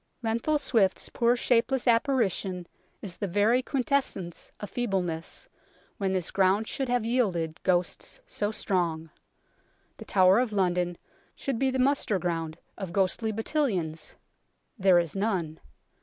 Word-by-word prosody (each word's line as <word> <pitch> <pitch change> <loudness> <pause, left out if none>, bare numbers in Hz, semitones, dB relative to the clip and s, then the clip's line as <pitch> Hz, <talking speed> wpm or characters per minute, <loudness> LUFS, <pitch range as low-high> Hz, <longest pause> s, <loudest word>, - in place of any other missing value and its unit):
Lenthal 230 +7 +1
Swifte's 225 -9 +1
poor 235 +1 +2
shapeless 250 +1 +1
apparition 230 - +1 0.4
is 185 -4 -6
the 200 - -2
very 205 +7 +3
quintessence 255 - -2
of 205 - -5
feebleness, 190 - -2 0.5
when 195 -2 0
this 185 -3 -1
ground 195 +3 +2
should 270 -2 -2
have 245 -2 +1
yielded 185 -10 0
ghosts 180 -1 -1
so 205 - -2
strong. 170 -7 -1 0.9
The - - -10
Tower 190 +1 +5
of 250 -3 0
London 180 -3 +1 0.4
should 270 -4 -3
be 270 - +2
the 260 - -1
muster 260 -5 +2
ground 165 -3 -2 0.2
of 190 -4 -5
ghostly 195 +4 +1
battalions. 200 - -1 0.6
There 190 -5 +5
is 170 -1 0
none. 185 -6 -1
200 Hz, 130 wpm, -28 LUFS, 175-240 Hz, 0.9 s, Tower